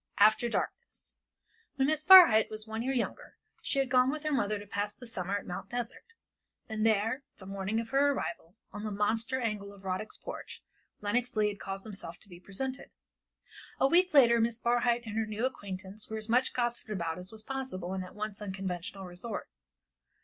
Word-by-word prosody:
AFTER 215 +3 +5
DARKNESS. - - -5 0.6
When 270 -1 +2
Miss 305 +1 +1
Barhyte 340 -12 +9
was 215 0 -5
one 220 0 -4
year 260 +3 -1
younger 250 -3 -3 0.2
she - - -2
had 270 -2 +1
gone 255 0 +5
with 305 +2 -3
her 305 - -1
mother 215 -7 +1
to 205 - -9
pass 205 +1 -3
the 245 - -11
summer 195 -3 -2
at 205 - -8
Mt. 180 +2 -6
Desert; 240 -1 -4 0.6
and 220 -1 -2
there, 225 +4 +2 0.2
the 190 - -12
morning 195 +3 -2
of 230 +1 -4
her 275 +2 +4
arrival, 170 -8 -4 0.2
on 210 - -6
the 215 - -2
monster 225 +5 0
angle 210 -4 -3
of 200 -1 -15
Rodick's 190 +3 -3
porch, - - -8 0.4
Lenox 240 +4 0
Leigh 210 -1 +3
had 205 - -7
caused 195 0 -5
himself 200 -6 -6
to 200 - -10
be 175 -1 -11
presented. 260 +9 -5 0.9
A 270 - +5
week 360 +5 +4
later 240 -6 +6
Miss 230 0 +1
Barhyte 240 0 +2
and 215 -1 -6
her 225 -1 0
new 215 +3 -1
acquaintance 200 -4 -4
were 220 - -3
as 215 0 -3
much 250 +3 +3
gossiped 240 -2 -2
about 170 -5 -2
as 180 +1 -7
was 220 -1 -7
possible 255 -9 -4
in 190 - -2
that 185 +1 -9
once 210 -1 -4
unconventional 190 -1 -5
resort. 180 +5 -5
215 Hz, 195 wpm, -31 LUFS, 200-245 Hz, 0.9 s, Barhyte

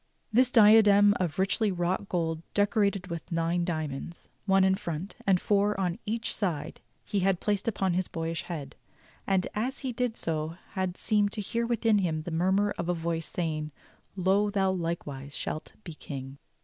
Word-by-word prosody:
This 250 +2 +5
diadem 210 -3 +7
of 170 -5 -1
richly 195 +2 +1
wrought 180 +2 -1
gold, 165 -2 -1
decorated 205 -2 +2
with 170 0 -6
nine 165 +1 +1
diamonds 155 -1 -4
— - - -41
one 195 0 +5
in 190 0 +4
front 175 -1 -4
and 190 -2 +4
four 205 +1 +1
on 180 -2 -1
each 230 +2 -1
side, 165 -6 -3 0.2
he 205 - -1
had 190 -1 +2
placed 205 -1 -1
upon 195 -5 +1
his 185 +1 0
boyish 165 0 -3
head; 150 -6 -6 0.5
and 190 -1 +2
as 250 +6 -2
he 260 - 0
did 240 -1 -2
so 160 0 -2 0.2
had 185 -2 -2
seemed 210 -2 +2
to 215 - -2
hear 230 +3 -1
within 225 -2 +2
him 160 -5 -1
the 175 - -6
murmur 190 +5 +2
of 170 0 -2
a 180 - +2
voice 165 -1 -2
saying: 155 -3 -2 0.5
"Lo, 195 +2 +2
thou 195 -2 +1
likewise 150 -6 -4
shalt 155 - -5
be 170 - -7
king." 135 -2 -8
185 Hz, 175 wpm, -28 LUFS, 165-205 Hz, 0.5 s, diadem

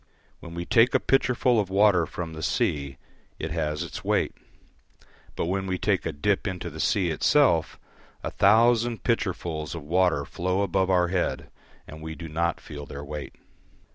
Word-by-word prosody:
When 85 -1 -10
we 85 0 -4
take 115 +6 +4
a - - +5
pitcherful 125 -3 +2
of 100 -3 -1
water 95 -4 +4
from 85 -2 -6
the 80 - -7
sea 70 -3 -1 0.4
it 80 - -5
has 75 -2 -1
its - - -7
weight, - - +1 1.0
but - - -1
when 95 +2 -2
we 95 -1 -1
take 95 -2 0
a - - -1
dip 95 +8 0
into 90 -3 -4
the 80 - -9
sea 90 +2 +1
itself 85 - +2 0.4
a - - -3
thousand 115 +4 +3
pitchersful 95 -8 -1
of 85 - -7
water 85 -2 +2
flow 95 +5 -1
above 95 0 +1
our 90 -2 +3
head, 90 -1 -2 0.3
and 80 +1 -11
we 80 0 -6
do 80 +2 -8
not 85 +2 -1
feel 75 -1 -9
their 70 +1 -7
weight. 75 0 -7
90 Hz, 170 wpm, -26 LUFS, 80-100 Hz, 1.0 s, a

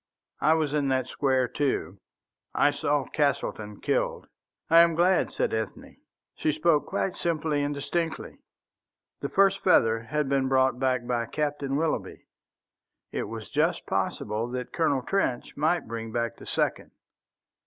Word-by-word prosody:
I 155 - +4
was 155 -3 0
in 145 -2 +1
that 130 -1 +1
square, 130 -1 +1
too. 145 +1 -2 0.6
I 145 - +4
saw 145 -1 0
Castleton 110 -8 -2
killed." - - -1 0.4
"I 165 +1 +7
am 170 -1 +5
glad," 175 +2 +3
said - - -1
Ethne. 110 0 -4 0.4
She 155 - 0
spoke 155 0 +2
quite 190 - -1
simply 160 -3 -1
and 145 0 -1
distinctly. 165 +3 -3 0.8
The - - -3
first 195 0 +3
feather 115 -11 +4
had 150 +4 -1
been 135 -1 +1
brought 130 -1 +2
back 130 -2 0
by 120 -1 -1
Captain 145 -2 -2
Willoughby. 160 +2 -2 0.9
It - - -2
was 110 0 -8
just - - +1
possible 110 +3 -2
that 125 0 -5
Colonel 145 -6 +1
Trench 130 -10 -1
might 160 +4 +1
bring 115 0 -5
back 115 0 -2
the - - -12
second. - - -1
140 Hz, 145 wpm, -27 LUFS, 125-160 Hz, 0.9 s, I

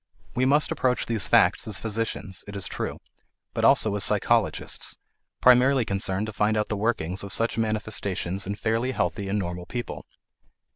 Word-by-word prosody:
We 125 +1 +1
must 145 +3 +3
approach 125 -1 0
these 115 -3 0
facts - - +3
as 105 - -1
physicians, 110 -4 -3
it 100 - -8
is 100 - -2
true, - - -4 0.6
but - - -2
also 110 - +5
as 100 - +1
psychologists, - - +1 0.4
primarily 125 0 +5
concerned 100 0 -1
to 110 - -7
find 105 +2 +1
out 105 - -1
the 105 - -1
workings 100 -4 -1
of 100 - -7
such 115 0 0
manifestations 100 -4 -1
in 100 - -2
fairly 115 +4 -1
healthy 100 -5 -2
and 100 - 0
normal 90 -2 -4
people. 120 -1 -6
105 Hz, 165 wpm, -25 LUFS, 100-115 Hz, 0.6 s, also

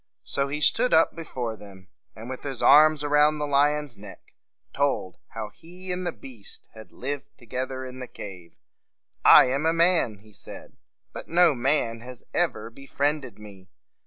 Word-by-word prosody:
So 140 0 -1
he 150 +2 -4
stood 230 - +3
up 160 - +3
before 125 -9 -5
them, 95 -3 -15 0.3
and, 110 +2 -10
with 130 0 -7
his 135 -4 -5
arm 155 +2 +7
around 150 +1 +3
the 150 - -2
lion's 145 -1 +1
neck, 100 -1 -14 0.4
told 140 -10 -1 0.2
how 110 -2 -5
he 180 - -11
and 180 0 -3
the - - -1
beast 120 -9 -11
had 110 0 -13
lived 140 +2 -6
together 130 +2 -5
in 130 0 -9
the 125 - -7
cave. 90 -7 -11 0.7
"I - - +9
am 140 +4 0
a 165 - +2
man," 165 - +3
he 110 -1 -19
said; - - -11 0.4
"but - - -8
no 170 -1 +4
man 120 -3 0
has 125 +1 -11
ever 115 -10 -1
befriended 140 +1 -3
me. 100 -3 -14
135 Hz, 165 wpm, -25 LUFS, 115-150 Hz, 0.7 s, I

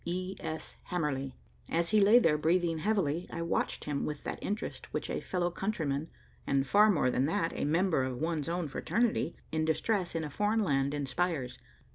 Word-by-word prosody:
"E. 185 +2 -3
S. 160 0 -5
Hamerly." 140 -6 -2 0.3
As 170 +1 +1
he 215 -1 +4
lay 210 +4 +7
there, 165 -11 +4
breathing 165 +1 +1
heavily, 180 -4 0
I 170 - -3
watched 170 - -1
him 145 -2 -2
with 150 -1 -4
that - - -5
interest 210 +2 -4
which - - -3
a - - -1
fellow 175 -1 -1
countryman, 160 -6 -2 0.4
and 135 -1 +2
far 210 +9 +5
more 150 -10 +3
than 130 +3 +1
that, 165 +1 0
a - - -1
member 165 0 +2
of 130 -1 -3
one's 160 +1 -1
own 175 -1 -1
fraternity, 220 - 0 0.2
in 160 0 0
distress 175 +3 0
in 165 - -1
a 150 - -4
foreign 210 +5 +1
land 140 -4 +1
inspires. 145 -1 -2
165 Hz, 185 wpm, -31 LUFS, 145-185 Hz, 0.4 s, lay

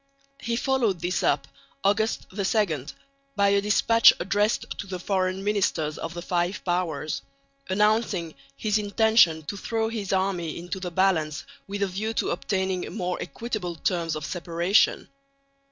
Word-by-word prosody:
He 235 - -2
followed 235 -7 +1
this 175 +1 0
up - - +1 0.4
(August 215 +3 +1
2) 195 - 0 0.5
by 200 -1 +4
a 200 0 +3
despatch 230 +2 +6
addressed 205 +5 +1
to 200 - -5
the 185 -1 -4
Foreign 185 +1 -1
Ministers 185 -7 0
of 165 +1 -5
the 175 - -5
Five 175 +2 -1
Powers, 175 -4 -1 0.5
announcing 210 -4 +1 0.2
his 215 -1 +1
intention 205 -6 +4
"to 175 - -5
throw 220 +2 -1
his 215 -4 -4
army 185 -4 0
into 175 +3 -5
the 180 -1 -4
balance 165 -5 +1 0.2
with 200 +1 -2
a - - +1
view 215 +4 -3
to - - 0
obtaining 190 -2 -2
more 180 -4 -3
equitable 215 -7 -4
terms 165 -1 -1
of 155 0 -4
separation." 175 +3 +1
190 Hz, 145 wpm, -26 LUFS, 175-210 Hz, 0.5 s, despatch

